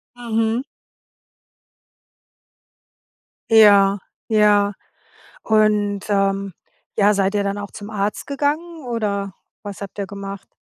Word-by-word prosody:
Mhm. 225 0 -1 2.9
Ja, 205 -3 +6 0.3
ja. 210 -2 +3 0.7
Und, 210 -2 +2
ähm, 195 -1 0 0.4
ja, 210 0 +4
seid 195 0 0
ihr 205 -1 +1
dann 200 +1 -2
auch 205 -1 -6
zum 205 -1 -9
Arzt 205 -1 -3
gegangen, 300 +3 -2
oder 205 -5 -2 0.3
was 205 -1 -8
habt 200 0 -9
ihr 200 - -2
gemacht? 200 -1 -8
205 Hz, 100 wpm, -20 LUFS, 200-220 Hz, 2.9 s, Ja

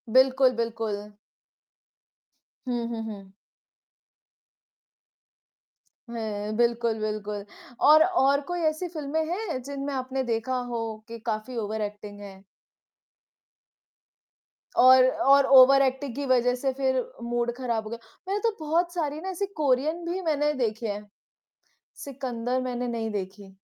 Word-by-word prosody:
बिल्कुल, 260 0 +5
बिल्कुल। 225 -3 -2 1.7
हुँ, 240 -1 -1
हुँ, 230 -1 -4
हुँ। 200 -3 -8 2.8
हुँ, 215 -2 -4
बिल्कुल, 235 -1 +1
बिल्कुल। 210 -1 -3 0.4
और 310 +1 +8 0.2
और 280 +1 +3
कोई 350 - -2
ऐसी 310 +4 -4
फ़िल्में 315 -1 -2
हैं 360 -9 -3
जिनमें 280 +2 -5
आपने 260 0 -2
देखा 240 +2 -1
हो 235 - -2 0.3
कि 230 0 -8
काफ़ी 220 +2 -3
ओवर 220 0 -3
एक्टिंग 205 0 -6
है? 195 -1 -11 2.3
और 255 0 +8
और 275 +1 +4
ओवरएक्टिंग 265 -1 +5
की 285 - -3
वज़ह 250 -1 +3
से 265 +2 -1
फिर 260 -1 +1 0.2
मूड 240 0 -1
खराब 235 -4 -2
हो 215 - -8
गया, 235 +1 -6 0.3
मैंने 400 +2 0
तो 435 - -7
बहुत 335 +3 0
सारी 305 -4 -2
ना 380 - -5
ऐसी 380 +2 -2 0.2
कोरियन 295 +5 +1
भी 355 +3 -3
मैंने 300 -3 +1
देखी 225 +1 -2
हैं 210 -1 -4 1.0
सिकंदर 255 -2 -3
मैंने 250 -1 -3
नहीं 225 -2 -3
देखी। 195 0 -6
250 Hz, 125 wpm, -26 LUFS, 225-280 Hz, 2.8 s, और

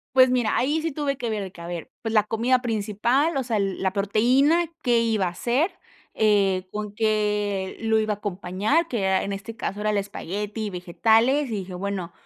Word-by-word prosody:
Pues, 260 0 +7
mira, 245 -4 +1
ahí 295 +5 +1
sí 325 0 -2
tuve 280 -1 -2
que 240 -4 -3
ver, 215 -2 -2
de 190 - -7
que 170 - -13
a 170 - -7
ver, 170 -2 -6
pues, 225 -2 -3
la 215 -2 +5
comida 235 +4 +1
principal, 235 +7 0
o 270 - 0
sea, 230 -3 -1
la 195 -1 -1
proteína, 250 - +3 0.2
qué 240 -2 +3
iba 220 -4 +1
a - - 0
hacer, 245 - 0 0.4
eh, 195 -3 +2
con 210 -1 -5
qué 210 -3 0
lo 220 -1 +2
iba 215 -1 0
a - - -7
acompañar, 205 - 0
que 235 -9 -2
era 190 0 +2
en 200 - -3
este 200 +3 -7
caso, 205 -2 -4
era 215 0 +1
el 210 - 0
espagueti 205 +2 -4
y 210 - -2
vegetales, 225 +10 +2
y 215 - -1
dije: 185 -1 -7
"Bueno, 190 -2 -4
215 Hz, 210 wpm, -24 LUFS, 195-245 Hz, 0.4 s, Pues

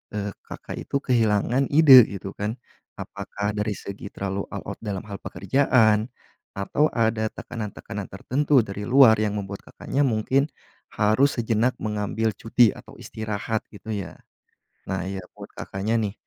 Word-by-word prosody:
eee, 105 -1 -2 0.2
Kakak - - -8
itu - - -4
kehilangan 120 +2 +2
ide 140 -6 +8
gitu 100 0 -6
kan, 105 +3 -2 0.4
apakah 100 +1 -4
dari 105 0 -2
segi 100 +1 -8
terlalu 100 0 -4
all - - -7
out - - -7
dalam 100 -3 -4
hal 100 -1 -8
pekerjaan? 110 +2 +2 0.5
Atau 120 +10 +1
ada 110 -1 +1
tekanan-tekanan 105 -3 -7
tertentu 135 +8 +2
dari 105 0 -6
luar 125 -3 +7
yang 105 -1 0
membuat 100 0 -8
Kakaknya 140 0 -1
mungkin 130 +5 +1 0.5
harus 110 +7 +3
sejenak 115 +2 +1
mengambil 110 +1 -1
cuti 115 +1 +3
atau - - -13
istirahat, 110 0 -4
gitu 110 +1 -9
ya? 95 -5 -6 0.8
Nah 95 -2 -1
ya 95 -1 -5
buat - - -10
Kakaknya 100 +4 -3
nih, 100 -2 -2
110 Hz, 145 wpm, -24 LUFS, 100-120 Hz, 0.8 s, ide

